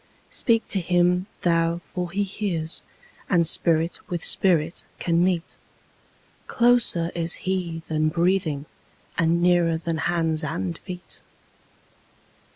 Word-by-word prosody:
Speak 230 -1 +2
to 195 - +2
Him 180 +1 +2
thou 165 -1 +2
for 180 0 -5
He 200 +4 0
hears, 185 -5 -2 0.5
and 170 -2 +3
Spirit 165 0 +1
with 175 -1 -3
Spirit 165 -3 +2
can 170 0 +1
meet—Closer 185 +2 -1
is 170 0 -1
He 175 -3 -2
than 155 0 +1
breathing, 170 -3 0 0.5
and 170 +1 +2
nearer 175 -2 +3
than 165 0 -3
hands 165 -2 0
and 95 - -3
feet. 180 0 -9
170 Hz, 110 wpm, -24 LUFS, 165-180 Hz, 0.5 s, and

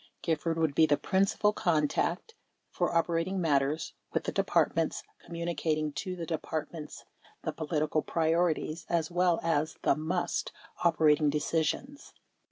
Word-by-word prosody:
Gifford 165 0 0
would 160 -3 +1
be 160 +2 +5
the 145 - +3
principal 200 +2 +2
contact 170 - 0 0.4
for - - 0
operating 170 +3 +1
matters 150 -2 +1 0.2
with - - -1
the - - -2
Departments, - - +1 0.2
communicating 160 -2 -2
to 185 +3 -4
the 170 -2 -5
Departments 160 -1 -5 0.4
the - - -2
political 155 -1 0
priorities 165 0 0
as 170 0 0
well 175 -1 +2
as 155 -2 0
the - - +4
"must" 160 +4 -2 0.3
operating 155 -3 +4
deci 150 +2 +1
sions. 270 - -4
165 Hz, 130 wpm, -30 LUFS, 155-175 Hz, 0.4 s, be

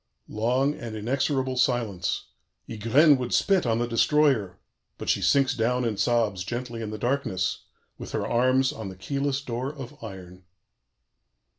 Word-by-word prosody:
"Long 125 +6 +1
and 115 -6 -7
inexorable 130 +3 -1
silence. 115 -8 0 0.4
Ygraine 130 +7 +4
would 125 -1 -1
spit 190 -8 +2
on 115 -1 +2
the 120 - 0
Destroyer, 120 -5 +2 0.4
but - - -5
she - - +2
sinks 135 -1 +3
down 125 +1 0
and 110 -4 -2
sobs 110 -6 +1
gently 120 +3 -5
in 110 - -4
the 110 - -5
darkness, 110 -7 -1 0.3
with - - -7
her - - -1
arms 130 +2 +2
on 110 -7 -6
the 95 - -9
keyless 140 +8 -2
door 125 +1 -3
of 135 -3 -10
iron." 90 -3 -10
120 Hz, 150 wpm, -26 LUFS, 110-135 Hz, 0.4 s, Ygraine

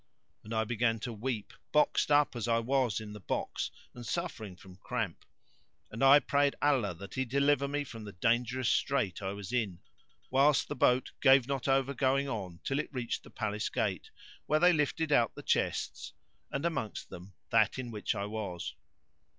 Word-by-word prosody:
And 110 - -11
I 110 -1 +1
began 115 0 +1
to 120 -1 -4
weep, 115 -1 -4 0.2
boxed 150 0 +3
up 145 -2 +4
as 120 -1 -3
I 115 -1 +3
was 120 -2 +1
in 105 -1 -8
the 105 - -8
box 95 - -3 0.2
and 120 - -9
suffering 120 - -4
from 90 0 -15
cramp; 110 -4 -4 0.7
and 115 +4 -3
I 135 +1 +9
prayed 140 0 +2
Allah 130 -11 +2
that 100 +4 -10
He 130 - 0
deliver 140 +2 +2
me 145 +1 -1
from 115 -5 -9
the 105 - -7
dangerous 120 +5 0
strait 130 -10 +1
I 95 0 -3
was 100 +2 -7
in, 105 -8 0 0.5
whilst 140 +2 +4
the - - -3
boat 125 0 +2
gave 135 -2 +6
not 140 -1 -2
over 135 0 +2
going 135 +1 +1
on 95 -9 -5
till 135 +1 -1
it 150 - -4
reached 125 -4 -3
the - - -15
Palace 105 -2 -2
gate - - -2 0.4
where 155 - +3
they 180 +1 +6
lifted 155 0 0
out 120 -5 +3
the - - -9
chests - - -1 0.4
and 140 +4 -3
amongst 140 -11 -3
them 90 +2 -10 0.2
that - - +3
in 125 -2 -5
which 105 -2 -2
I 100 - -2
was. 105 -5 -4
120 Hz, 185 wpm, -31 LUFS, 105-140 Hz, 0.7 s, I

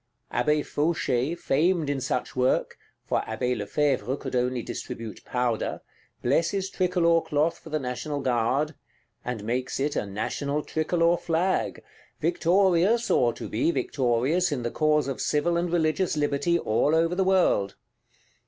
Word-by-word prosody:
Abbé 150 +4 +1
Fauchet, 150 -2 0
famed 165 +2 +1
in 140 -2 -1
such 125 0 -2
work 130 0 +1 0.3
(for - - 0
Abbé 125 0 -2
Lefevre 130 +5 0
could 130 -2 -5
only 125 -1 0
distribute 115 -2 -7
powder) 125 -3 -1 0.4
blesses 170 +9 +1
tricolor 175 -2 +2
cloth 150 +3 0
for - - -12
the 155 - 0
National 140 +2 -3
Guard; 130 +4 0 0.5
and 125 -4 -4
makes 125 +4 -2
it 145 +2 0
a 105 - -1
National 140 +9 -2
Tricolor 165 +2 +1
Flag; 170 +3 -1 0.4
victorious, 195 - +2
or 120 -1 +4
to - - -7
be 115 +9 0
victorious, 140 +4 +1
in 130 -4 -2
the 120 - -2
cause 155 -2 +2
of 135 - -3
civil 160 +3 +1
and 170 0 0
religious 165 0 +1
liberty 150 +4 +1
all 145 +3 +1
over 165 +1 +2
the 190 +2 +1
world. 185 - +2
150 Hz, 145 wpm, -26 LUFS, 125-170 Hz, 0.5 s, or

